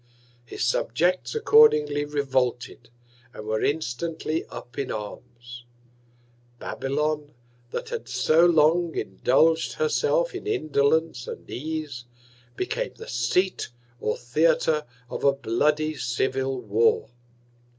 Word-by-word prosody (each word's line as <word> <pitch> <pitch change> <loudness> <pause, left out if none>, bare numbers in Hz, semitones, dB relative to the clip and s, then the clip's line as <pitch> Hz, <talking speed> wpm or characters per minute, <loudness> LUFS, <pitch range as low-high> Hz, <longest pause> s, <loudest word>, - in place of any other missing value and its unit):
His 115 -1 -3
Subjects 165 - 0
accordingly 150 - +5
revolted, 135 -4 -1 0.5
and 105 - -8
were 110 0 -1
instantly 160 +2 -2
up 120 +1 -9
in 140 - -2
Arms. 120 +3 -8 0.9
Babylon, 150 +3 -2 0.3
that - - -5
had 475 -1 -5
so 160 +2 +3
long 170 0 +4
indulg'd 160 +5 +2
herself 470 +1 +1
in - - -6
Indolence 155 - +1
and - - -8
Ease, 150 -3 -5 0.5
became - - -3
the 455 - -10
Seat, 190 - 0 0.3
or 105 - -1
Theatre 155 +4 +2 0.2
of - - -6
a 140 - +5
bloody 150 +5 0
Civil 130 0 -1
War. 115 +2 +2
150 Hz, 105 wpm, -25 LUFS, 125-165 Hz, 0.9 s, accordingly